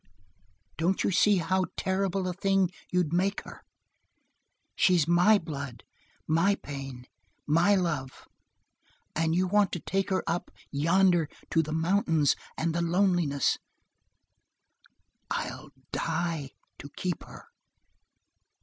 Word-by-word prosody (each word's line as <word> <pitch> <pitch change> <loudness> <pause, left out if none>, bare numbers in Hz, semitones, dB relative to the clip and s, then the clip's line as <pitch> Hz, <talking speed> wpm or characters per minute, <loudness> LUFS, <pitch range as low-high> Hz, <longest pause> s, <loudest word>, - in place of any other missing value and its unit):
Don't 180 +4 +1
you - - +1
see 205 +3 +4
how 185 +1 +1
terrible 190 0 0
a 180 - -2
thing 195 -1 +1 0.2
you'd 180 -3 +1
make 195 +3 +1
her? - - -11 1.1
She's 175 -5 +3
my 180 +5 +5
blood, 140 - -6 0.4
my 165 +6 +3
pain, 135 -6 -8 0.4
my 170 +7 +4
love, 155 -8 -2 0.9
and 160 +1 +1
you 185 +1 +2
want 205 +1 +3
to 175 - -2
take 195 +4 -1
her 190 - 0
up 170 +1 -2 0.2
yonder 170 +2 +3 0.2
to 165 - +4
the 155 -1 -5
mountains 160 -2 +2 0.2
and 165 0 0
the 170 - 0
loneliness 170 -5 +2 1.7
I'll - - -4 0.2
die 165 -5 -2 0.3
to 145 - -9
keep 180 -1 -3
her!" 460 - -13
175 Hz, 115 wpm, -28 LUFS, 160-190 Hz, 1.7 s, my